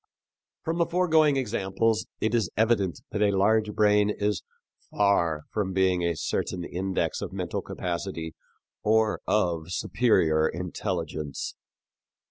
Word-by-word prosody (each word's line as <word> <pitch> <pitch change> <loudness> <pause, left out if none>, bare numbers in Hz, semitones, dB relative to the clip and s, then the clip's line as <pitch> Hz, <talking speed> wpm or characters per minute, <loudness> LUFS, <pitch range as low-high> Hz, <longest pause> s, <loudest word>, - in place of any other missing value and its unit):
From 165 +2 -2
the 170 - +3
foregoing 160 -5 +3
examples 110 -2 0
it 110 - 0
is 110 -6 +1
evident 105 - +1
that 105 - -2
a 100 -2 +3
large 110 +2 +3
brain 105 0 +4
is 105 -1 -1 0.5
far 85 -7 +2
from 100 -3 -1
being 95 -1 +2
a 85 -1 0
certain 90 +4 -2
index 95 +2 -2
of - - -4
mental - - -3
capacity 85 -2 -4 0.5
or 110 0 +2
of 85 -5 0
superior 80 -9 +2
intelligence. 85 -4 -4
100 Hz, 120 wpm, -27 LUFS, 85-110 Hz, 0.5 s, brain